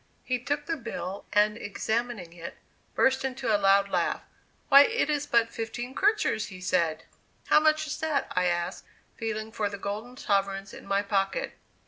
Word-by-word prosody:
He 255 -1 -1
took 290 +4 -2
the 330 +1 -2
bill, 200 -6 -6
and 210 +1 +3
examining 220 -3 -3
it, 170 -1 -8 0.4
burst 265 0 +3
into 255 -4 0
a - - +2
loud 195 0 +5
laugh. - - 0 0.4
"Why, 275 0 +9
it 450 -9 0
is 290 -1 -1
but 230 -1 +3
fifteen 240 +3 -5
kreutzers!" 405 - +1
he 185 -2 -10
said. 170 -4 0 0.5
"How - - +7
much 310 0 +3
is 300 - -4
that?" 315 -3 -1
I 180 0 +2
asked, 175 +1 -1 0.3
feeling 220 -1 -4
for 210 -2 -1
the 200 - -6
golden 215 +6 -5
sovereigns 195 -4 -1
in - - -11
my 200 0 +1
pocket. 195 -1 -1
220 Hz, 170 wpm, -28 LUFS, 195-265 Hz, 0.5 s, Why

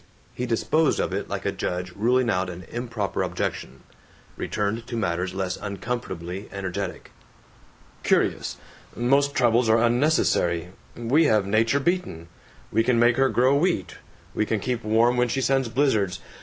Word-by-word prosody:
He 125 - -3
disposed 150 +6 +1
of - - -1
it - - -3
like - - -4
a - - +1
judge 90 0 -3
ruling 125 +4 +2
out 95 -4 0
an 90 +1 -8
improper 115 -4 -3
objection; 65 - -4 0.5
returned 110 +3 -2
to 120 - -4
matters 90 -2 -1
less 95 -1 -2
uncomfortably 100 -3 -5
energetic: 100 -1 -5 0.9
"Curious. - - +1 0.4
Most 140 +4 +2
troubles 120 -1 +3
are 110 - +5
unnecessary. 115 - +2 0.3
We 130 +8 +3
have 110 -8 +3
Nature 115 +7 +2
beaten; 140 - -2 0.4
we 115 +2 +2
can 125 0 +2
make 120 0 +4
her 135 0 +4
grow 130 +3 +3
wheat; 175 +5 0 0.3
we - - +1
can 110 0 -1
keep 120 +2 -3
warm 115 +3 +3
when 125 0 +3
she 135 - -1
sends 135 -2 +1
blizzards. 110 -7 +1
115 Hz, 150 wpm, -25 LUFS, 100-125 Hz, 0.9 s, are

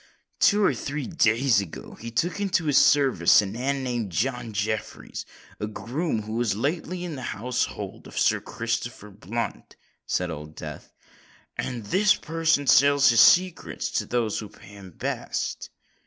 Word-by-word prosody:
"Two 210 0 +4
or - - +3
three 145 -1 -4
days 115 0 +3
ago 90 -5 -9
he 115 - -8
took 170 - -1
into 190 -4 0
his 145 -3 +5
service 135 - +5
a 105 - +2
man 130 +7 -2
named 120 -6 -2
John 120 - -2
Jeffreys—a 105 0 -5
groom 120 +3 -3
who 110 +1 -6
was 115 -4 0
lately 160 - -2
in 175 -3 -4
the 135 - -6 0.2
household 125 +3 -3
of - - -13
a - - -8
certain - - +2
Sir - - -9
Christopher 115 -2 -3
Blunt," 110 +4 -5 0.3
said 90 -1 -1
Old 75 0 -8
Death; - - -8 0.6
"and 120 -4 -4
this 190 - +3
person 160 -3 0
sells 140 +1 +6
his 115 -1 +6
secrets 180 -1 +3
to - - -1
those 115 -3 0
who 105 - -7
pay 95 - -16
him 100 -2 -12
best." 85 - -4
120 Hz, 160 wpm, -25 LUFS, 105-145 Hz, 0.6 s, sells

